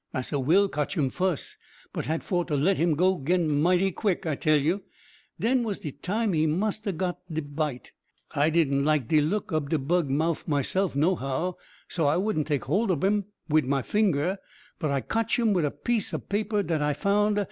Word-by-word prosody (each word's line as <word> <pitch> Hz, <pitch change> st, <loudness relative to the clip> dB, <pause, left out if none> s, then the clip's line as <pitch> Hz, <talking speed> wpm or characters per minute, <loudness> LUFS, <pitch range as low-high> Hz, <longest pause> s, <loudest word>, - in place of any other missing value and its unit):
Massa 130 Hz, +2 st, -1 dB
Will 175 Hz, +10 st, +4 dB
cotch 150 Hz, -4 st, -3 dB
him 135 Hz, -4 st, +1 dB
fuss, 180 Hz, -2 st, -2 dB, 0.4 s
but -, -, -3 dB
had 160 Hz, +2 st, -1 dB
for 175 Hz, -2 st, 0 dB
to 150 Hz, -4 st, -1 dB
let 180 Hz, +7 st, +2 dB
him 165 Hz, -1 st, +2 dB
go 185 Hz, +3 st, +2 dB
'gin 160 Hz, -2 st, +1 dB
mighty 180 Hz, +3 st, +3 dB
quick, 190 Hz, -1 st, -1 dB
I 160 Hz, -, 0 dB
tell 155 Hz, +2 st, +2 dB
you 165 Hz, +8 st, 0 dB, 0.6 s
den 250 Hz, +3 st, +2 dB
was 215 Hz, -4 st, -2 dB
de 150 Hz, -, -6 dB
time 200 Hz, -, -1 dB
he 160 Hz, 0 st, +2 dB
must 210 Hz, +7 st, -1 dB
ha' 195 Hz, -6 st, -2 dB
got 180 Hz, 0 st, -2 dB
de 160 Hz, 0 st, -2 dB
bite. 145 Hz, -3 st, -4 dB, 0.4 s
I 145 Hz, +2 st, +2 dB
didn't 145 Hz, -4 st, +2 dB
like 150 Hz, -5 st, +1 dB
de 155 Hz, -1 st, +4 dB
look 185 Hz, +4 st, -1 dB
ob 150 Hz, -3 st, -1 dB
de 160 Hz, -, +2 dB
bug 155 Hz, +2 st, 0 dB
mouff, 160 Hz, +5 st, 0 dB
myself, 160 Hz, +4 st, 0 dB
nohow, 160 Hz, +1 st, 0 dB, 0.3 s
so 160 Hz, -4 st, 0 dB
I 145 Hz, -, +3 dB
wouldn't 185 Hz, -6 st, 0 dB
take 145 Hz, -3 st, -1 dB
hold 195 Hz, +11 st, +1 dB
ob 165 Hz, -6 st, 0 dB
him 205 Hz, +1 st, +2 dB, 0.2 s
wid 155 Hz, -2 st, +3 dB
my 135 Hz, 0 st, 0 dB
finger, 190 Hz, -3 st, +1 dB, 0.4 s
but 155 Hz, -, -1 dB
I 140 Hz, -1 st, 0 dB
cotch 225 Hz, -, 0 dB
him 230 Hz, -3 st, +2 dB
wid 175 Hz, -5 st, +2 dB
a -, -, +1 dB
piece 230 Hz, +7 st, -1 dB
ob -, -, -7 dB
paper 205 Hz, 0 st, 0 dB
dat 160 Hz, -5 st, -1 dB
I 150 Hz, 0 st, +1 dB
found. 205 Hz, +5 st, +2 dB
165 Hz, 210 wpm, -27 LUFS, 145-195 Hz, 0.6 s, Will